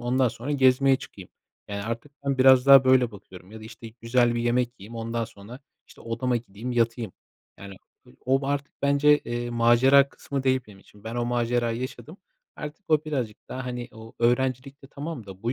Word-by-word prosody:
ondan 125 Hz, +1 st, +1 dB
sonra 120 Hz, +5 st, -7 dB
gezmeye 135 Hz, -1 st, +4 dB
çıkayım. -, -, -12 dB, 0.4 s
Yani, 100 Hz, 0 st, -4 dB
artık 115 Hz, +6 st, -6 dB
ben 140 Hz, -1 st, -1 dB
biraz 130 Hz, 0 st, +6 dB
daha 135 Hz, -1 st, +8 dB
böyle 130 Hz, -2 st, +4 dB
bakıyorum 95 Hz, -2 st, -14 dB
ya 110 Hz, -, -10 dB
da, -, -, -11 dB
işte, 115 Hz, +1 st, -10 dB
güzel 120 Hz, 0 st, +2 dB
bir 120 Hz, -, -1 dB
yemek 120 Hz, 0 st, +1 dB
yiyeyim, 115 Hz, +4 st, -10 dB
ondan 115 Hz, 0 st, -3 dB
sonra, 115 Hz, +4 st, -12 dB, 0.3 s
işte, -, -, -18 dB
odama 120 Hz, +2 st, -1 dB
gideyim, 115 Hz, +2 st, -6 dB
yatayım. 115 Hz, -3 st, -1 dB, 0.5 s
Yani, 100 Hz, -1 st, -10 dB, 0.5 s
o 135 Hz, +1 st, +3 dB
ba 135 Hz, -, -3 dB
artık 140 Hz, 0 st, -2 dB
bence, 145 Hz, +1 st, +4 dB
eee, 120 Hz, 0 st, -5 dB
macera 120 Hz, +4 st, +5 dB
kısmı 140 Hz, -1 st, -5 dB
değil 130 Hz, -1 st, +2 dB
benim 105 Hz, -2 st, -15 dB
için. 100 Hz, +1 st, -21 dB
Ben 115 Hz, +1 st, -6 dB
o 120 Hz, 0 st, -1 dB
macerayı 120 Hz, -1 st, -1 dB
yaşadım, 145 Hz, +5 st, -7 dB, 0.4 s
artık 150 Hz, +7 st, -8 dB
o 155 Hz, -1 st, +2 dB
birazcık 130 Hz, -8 st, -4 dB
daha, 130 Hz, 0 st, -6 dB
hani, 125 Hz, -1 st, -5 dB
o 110 Hz, 0 st, -12 dB
öğrencilikte 130 Hz, +3 st, 0 dB
tamam 140 Hz, -4 st, -7 dB
da 95 Hz, -1 st, -12 dB
bu 120 Hz, +2 st, -1 dB
120 Hz, 190 wpm, -25 LUFS, 115-135 Hz, 0.5 s, daha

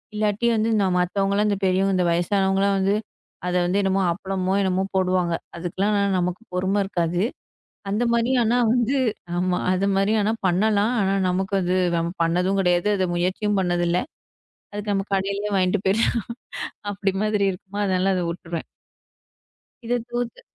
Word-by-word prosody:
இல்லாட்டி 210 Hz, +2 st, 0 dB
வந்து 220 Hz, +1 st, +1 dB
நான் 185 Hz, -2 st, +1 dB
மத்தவங்கல்லாம் 200 Hz, +3 st, +1 dB
இந்த 200 Hz, -, 0 dB
பெரியவங்க, 190 Hz, +1 st, +2 dB
இந்த 180 Hz, -, +2 dB
வயசானவங்கலாம் 195 Hz, +2 st, +2 dB
வந்து 195 Hz, +2 st, +2 dB, 0.5 s
அத 180 Hz, -, -1 dB
வந்து 190 Hz, +3 st, +1 dB
என்னமோ, 195 Hz, 0 st, +1 dB
அப்பளமோ 190 Hz, 0 st, -2 dB
என்னமோ 190 Hz, 0 st, +1 dB, 0.2 s
போடுவாங்க. 180 Hz, -2 st, +1 dB, 0.2 s
அதுக்கெல்லாம் 190 Hz, +5 st, -1 dB
நான் 200 Hz, -1 st, +1 dB
நமக்குப் 180 Hz, +4 st, -4 dB
பொறுமை 190 Hz, +3 st, +1 dB
இருக்காது. 175 Hz, -2 st, -1 dB, 0.7 s
அந்தமாரி 235 Hz, +3 st, +1 dB
ஆனா 240 Hz, +3 st, +2 dB, 0.2 s
வந்து 250 Hz, +3 st, +1 dB, 0.4 s
ஆமா. 180 Hz, 0 st, +1 dB
அதுமாரி 195 Hz, +2 st, +1 dB
ஆனா 215 Hz, +2 st, +1 dB, 0.2 s
பண்ணலாம். 210 Hz, +5 st, +2 dB
ஆனா 195 Hz, +1 st, +1 dB
நமக்கு 190 Hz, +2 st, 0 dB
அது 180 Hz, +1 st, +1 dB, 0.2 s
நம்ம 170 Hz, +1 st, -1 dB
பண்ணதும் 180 Hz, +4 st, +1 dB
கிடையாது. 180 Hz, +2 st, +2 dB
அத 185 Hz, -, +1 dB
முயற்சியும் 195 Hz, +3 st, 0 dB
பண்ணது 175 Hz, -1 st, 0 dB
இல்ல. 180 Hz, -, +2 dB, 0.7 s
அதுக்கு 205 Hz, 0 st, -3 dB
நம்ம 195 Hz, +1 st, -1 dB
கடையிலே 200 Hz, +2 st, -1 dB
வாங்கிட்டு 185 Hz, +1 st, +1 dB
போயிர்லாம். 225 Hz, +4 st, +2 dB, 0.7 s
அப்பிடி 195 Hz, -1 st, -1 dB
மாதிரி 210 Hz, -2 st, +1 dB
இருக்குமா! 190 Hz, +2 st, -8 dB
அதனால 190 Hz, 0 st, +1 dB
அத 180 Hz, -, 0 dB
விட்டுருவேன். 170 Hz, -1 st, -5 dB, 1.2 s
இதைத் 240 Hz, 0 st, -1 dB
தவிர்த்து 240 Hz, 0 st, -4 dB
195 Hz, 145 wpm, -23 LUFS, 180-205 Hz, 1.2 s, பெரியவங்க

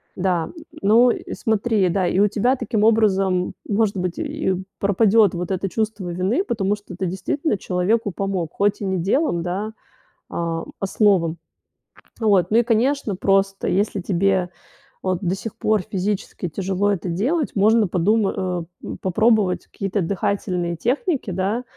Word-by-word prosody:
Да, 180 Hz, -3 st, 0 dB
н -, -, -11 dB, 0.3 s
но 230 Hz, +5 st, +5 dB
и -, -, -5 dB
смотри, 220 Hz, -2 st, +1 dB
да, 185 Hz, 0 st, +1 dB
и 185 Hz, -, +1 dB
у 205 Hz, -, +5 dB
тебя 230 Hz, +5 st, +1 dB
таким 220 Hz, -4 st, -1 dB
образом, 195 Hz, -5 st, +2 dB
может 210 Hz, -1 st, +1 dB
быть, 180 Hz, -1 st, -2 dB
и 300 Hz, -10 st, -1 dB, 0.2 s
пропадёт 205 Hz, +1 st, +4 dB
вот 175 Hz, +2 st, -4 dB
это 190 Hz, +1 st, -1 dB
чувство 215 Hz, -1 st, -2 dB
вины, 185 Hz, -, 0 dB
потому 205 Hz, -, 0 dB
что 205 Hz, -3 st, -11 dB
ты 190 Hz, -, -3 dB
действительно 195 Hz, -, -1 dB
человеку 195 Hz, +4 st, 0 dB
помог, 185 Hz, -4 st, -2 dB
хоть 205 Hz, +1 st, +1 dB
и -, -, -2 dB
не 190 Hz, -1 st, 0 dB
делом, 190 Hz, -, +1 dB
да, 195 Hz, +5 st, -3 dB, 0.6 s
а, 165 Hz, -1 st, -3 dB
а -, -, -1 dB
словом. 185 Hz, -6 st, +2 dB, 0.8 s
Вот. 200 Hz, -6 st, +3 dB
Ну 220 Hz, -, +4 dB
и, -, -, +3 dB
конечно, 240 Hz, -1 st, +1 dB
просто 195 Hz, +1 st, +1 dB
если 200 Hz, 0 st, 0 dB
тебе, 190 Hz, 0 st, +1 dB, 0.5 s
вот, 185 Hz, -2 st, 0 dB
до 185 Hz, -1 st, 0 dB
сих 215 Hz, +2 st, -7 dB
пор 215 Hz, -3 st, +1 dB
физически 195 Hz, -2 st, -3 dB
тяжело 195 Hz, +4 st, 0 dB
это 185 Hz, -2 st, -2 dB
делать, 255 Hz, -, 0 dB
можно 215 Hz, +1 st, +4 dB
подума 195 Hz, +4 st, +2 dB
э, 180 Hz, -2 st, -2 dB, 0.2 s
м, -, -, -5 dB
попробовать 210 Hz, 0 st, +2 dB
какие-то 195 Hz, 0 st, -2 dB
дыхательные 180 Hz, -2 st, -1 dB
техники. 270 Hz, -, -1 dB
Да. 195 Hz, +7 st, -1 dB
195 Hz, 155 wpm, -22 LUFS, 185-220 Hz, 0.8 s, но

